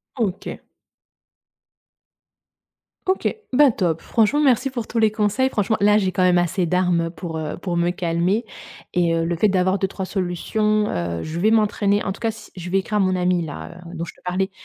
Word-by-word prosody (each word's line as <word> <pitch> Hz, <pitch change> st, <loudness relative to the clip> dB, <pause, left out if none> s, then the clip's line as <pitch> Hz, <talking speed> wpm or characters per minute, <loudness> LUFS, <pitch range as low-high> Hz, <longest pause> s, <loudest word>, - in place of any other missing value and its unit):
OK. 205 Hz, -7 st, -3 dB, 2.5 s
OK. 375 Hz, 0 st, +1 dB, 0.2 s
Ben, 280 Hz, +1 st, +6 dB
top. 170 Hz, -6 st, -1 dB
Franchement, 230 Hz, +7 st, +2 dB
merci 265 Hz, -2 st, +3 dB
pour 240 Hz, -4 st, -4 dB
tous 230 Hz, -, -2 dB
les 220 Hz, -1 st, +4 dB
conseils. 215 Hz, +5 st, +1 dB
Franchement, 215 Hz, -1 st, 0 dB
là, 205 Hz, +1 st, +5 dB
j'ai, 190 Hz, -3 st, +1 dB
quand 185 Hz, -, -1 dB
même, 180 Hz, -1 st, +4 dB
assez 175 Hz, +1 st, +1 dB
d'armes 175 Hz, -1 st, +1 dB
pour, 165 Hz, -1 st, -6 dB
heu, 155 Hz, -1 st, -4 dB
pour 175 Hz, -1 st, -3 dB
me 170 Hz, 0 st, +2 dB
calmer 180 Hz, +6 st, 0 dB, 0.5 s
et 170 Hz, -2 st, +2 dB
heu, 165 Hz, 0 st, 0 dB
le 170 Hz, 0 st, -1 dB
fait 210 Hz, +6 st, +3 dB
d'avoir 190 Hz, 0 st, +1 dB
2-3 190 Hz, 0 st, -2 dB
solutions, 210 Hz, +3 st, 0 dB
heu, 85 Hz, -1 st, -3 dB
je 160 Hz, +2 st, -4 dB
vais 215 Hz, +5 st, +3 dB
m'entraîner. 205 Hz, -2 st, +2 dB
En 195 Hz, -, -2 dB
tout 195 Hz, -, -8 dB
cas, 230 Hz, -, 0 dB
c 220 Hz, -, -13 dB
je 180 Hz, -1 st, -7 dB
vais 195 Hz, +2 st, +2 dB
écrire 210 Hz, +2 st, -2 dB
à -, -, +2 dB
mon 185 Hz, -1 st, +2 dB
ami-là, 180 Hz, -2 st, -2 dB
heu, 175 Hz, -, -9 dB
dont 170 Hz, 0 st, -3 dB
je 165 Hz, -, -10 dB
te -, -, -25 dB
parlais, 185 Hz, +2 st, -1 dB
185 Hz, 195 wpm, -22 LUFS, 175-215 Hz, 2.5 s, Ben